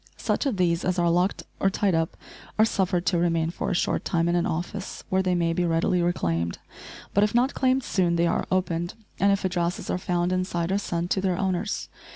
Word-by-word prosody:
Such - - 0
of 245 -7 -1
these 170 -2 +1
as 185 0 0
are 170 -1 +3
locked 180 +3 +1 0.2
or 195 - +3
tied 195 -1 +1
up 165 0 0 0.4
are 215 - +6
suffered 185 -4 0
to 175 - +2
remain 165 -1 +1
for - - -3
a 190 - 0
short - - 0
time 165 0 +1
in 170 - +2
an 175 - +1
office, 180 +4 -4
where 190 0 +2
they 185 -1 +1
may 170 -1 +1
be 180 - 0
readily 170 +1 +2
reclaimed; 85 - 0 0.6
but 200 - +4
if 210 +2 +1
not 250 +3 +3
claimed 260 0 +2
soon 175 -6 +1
they 170 0 +2
are 170 - 0
opened, 175 -2 -1 0.2
and 200 +1 +4
if 200 -1 0
addresses 175 -1 -1
are - - -1
found 175 0 0
inside 185 -1 -1
are 195 - +2
sent 175 -3 -3
to 190 - +2
their 185 -2 0
owners. 190 +1 -1
180 Hz, 220 wpm, -26 LUFS, 170-190 Hz, 0.6 s, are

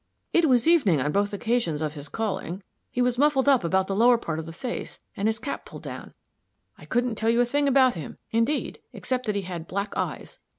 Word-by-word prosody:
"It 335 -3 +4
was 245 0 +3
evening 275 - +4
on 145 +3 0
both 205 +4 +1
occasions 210 -7 0
of 155 -1 -2
his 145 -1 -7
calling. 195 -2 -3 0.3
He 250 - 0
was 245 0 0
muffled 285 -2 +3
up 270 -7 +5
about 190 +3 +2
the 195 - -2
lower 240 +3 +5
part 165 -8 -4
of 160 - -6
the - - -6
face, 240 +9 -5 0.2
and 200 - 0
his 220 0 +1
cap 280 +5 -5
pulled - - -11
down. - - -8 0.6
I - - -14
couldn't 245 0 0
tell 220 +1 0
you 235 +1 +3
a - - +4
thing 285 +4 +1
about 260 -2 +5
him, 160 -4 -7
indeed, 230 +7 0
except 255 -2 -3
that 210 - 0
he 200 - -1
had 175 -3 -6
black 200 +2 -3
eyes. - - -4
225 Hz, 225 wpm, -26 LUFS, 185-250 Hz, 0.6 s, up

